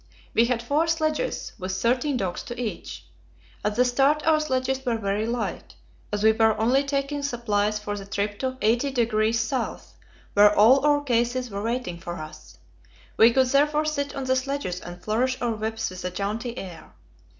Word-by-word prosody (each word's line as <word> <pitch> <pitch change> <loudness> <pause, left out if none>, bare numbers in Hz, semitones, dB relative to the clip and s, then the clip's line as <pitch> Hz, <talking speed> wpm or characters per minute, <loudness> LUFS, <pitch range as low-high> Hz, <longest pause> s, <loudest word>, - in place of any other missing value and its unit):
We 230 - +4
had 235 -1 -1
four 295 +7 +1
sledges, 320 +6 -1
with 185 0 -4
thirteen 250 +7 +1
dogs 185 -6 -3
to 240 0 -7
each. 170 - -5 0.6
At 210 0 -1
the 250 +2 +4
start 275 +4 +2
our 315 -1 +4
sledges 265 -2 -1
were 240 -3 0
very 205 +1 -1
light, 235 -1 -4 0.4
as 210 0 -2
we 220 - +7
were 220 0 +2
only 250 +5 +3
taking 280 +1 -2
supplies 215 -6 0
for 210 0 -4
the 200 -1 -7
trip 205 +1 -2
to 260 -1 -1
80° 230 0 +1
S., - - -20 0.4
where 205 0 +6
all 250 +7 +6
our 290 -1 +3
cases 245 -1 0
were 200 0 -4
waiting 225 -6 -3
for 175 0 -6
us; 155 -2 -10 0.6
we 225 +2 +6
could 260 +2 +3
therefore 295 +3 +2
sit 285 -2 -2
on 275 - -3
the 260 0 +1
sledges 260 -9 -2
and 175 0 -9
flourish 255 +4 0
our 240 -1 0
whips 220 0 -3
with 185 0 -8
a 180 - -1
jaunty 215 +6 -4
air. 175 -4 -9
235 Hz, 180 wpm, -25 LUFS, 210-270 Hz, 0.6 s, we